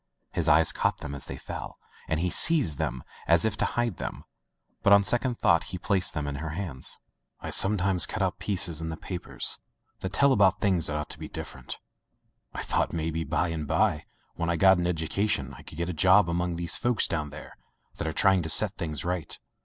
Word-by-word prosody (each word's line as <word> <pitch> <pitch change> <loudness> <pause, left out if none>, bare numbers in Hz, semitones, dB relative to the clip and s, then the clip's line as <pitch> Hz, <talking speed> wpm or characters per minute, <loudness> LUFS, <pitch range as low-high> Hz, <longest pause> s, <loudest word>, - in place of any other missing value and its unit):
His - - 0
eye 80 +2 +6
caught - - +1
them 75 - -6
as 70 -2 -6
they - - -7
fell, - - -7 0.3
and 80 0 0
he 90 +1 0
seized 150 - +3
them 65 - -2 0.2
as 85 +2 +4
if 110 -1 0
to - - +1
hide 120 -7 -1
them, - - -6 0.6
but 100 - +3
on 100 0 +7
second 120 +3 0
thought 85 -5 +3 0.2
placed 95 -6 +1
them 75 -2 -2
in 70 -1 -4
her 80 +2 -5
hands. 85 -10 -1 0.4
"I - - -6
sometimes 95 -3 +4
cut 105 - -2
out 95 0 -1
the - - -9
pieces 90 -5 +1
in 80 - -4
the 80 - -5
papers 90 0 -4 0.4
that 95 - -4
tell 140 +7 +4
about 100 -3 +4
things 90 -5 +2
that 75 - -2
ought 75 0 -4
to - - -7
be - - -6
different. - - -7 0.7
I - - -5
thought - - 0
maybe 80 0 -2
by 85 - 0
and 80 -3 -4
by 80 0 +1 0.3
when 85 - -3
I 85 - +1
got 95 +2 +5
an 85 - 0
education 80 -3 -1
I - - -12
could - - -12
get 85 0 -2
a 90 - -3
job 95 +4 +5
among 85 0 -1
those 85 0 0
fellows 120 -2 +1
down 75 -3 -2
there 75 +2 -11 0.4
that - - -3
are - - -1
try 95 +4 +4
ing 95 - +2
to 80 - -4
set - - +3
things 75 -3 -4
right." 90 -3 -3
85 Hz, 220 wpm, -27 LUFS, 80-95 Hz, 0.7 s, on